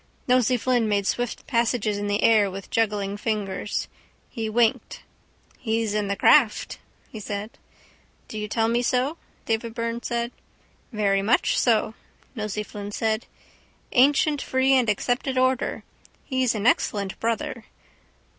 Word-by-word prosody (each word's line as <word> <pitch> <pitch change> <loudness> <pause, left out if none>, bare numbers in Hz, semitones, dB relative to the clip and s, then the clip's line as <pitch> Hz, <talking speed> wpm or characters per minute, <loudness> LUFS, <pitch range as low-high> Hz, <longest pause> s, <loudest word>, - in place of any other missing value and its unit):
Nosey 250 -1 +3
Flynn 240 -2 +1
made 200 -1 +1
swift 245 +3 -2
passes 230 -3 0
in 205 - -3
the 205 0 0
air 215 -3 +5
with 195 +1 -9
juggling 205 -3 0
fingers. 205 -2 -2 0.4
He 225 -3 -3
winked. 230 0 0 0.6
—He's 225 -2 -1
in 210 -1 0
the 200 - -1
craft, 240 0 +3 0.3
he 220 - -7
said. 205 +1 -5 0.8
—Do 215 - -6
you 210 - -3
tell 225 +1 +1
me 235 +1 +1
so? 255 +6 0 0.3
Davy 225 +1 -1
Byrne 230 +1 -3
said. 235 0 -2 0.6
—Very 200 -3 +1
much 220 +5 +2
so, 220 -2 +2 0.4
Nosey 210 -3 -3
Flynn 205 0 -8
said. 220 +1 -1 0.6
Ancient 285 +3 +3
free 260 +1 +2
and 250 -4 +3
accepted 245 +5 -1
order. 255 0 +1 0.4
He's 260 -3 0
an 210 0 -3
excellent 200 -5 +1
brother. 235 +2 -2
225 Hz, 135 wpm, -24 LUFS, 210-245 Hz, 0.8 s, air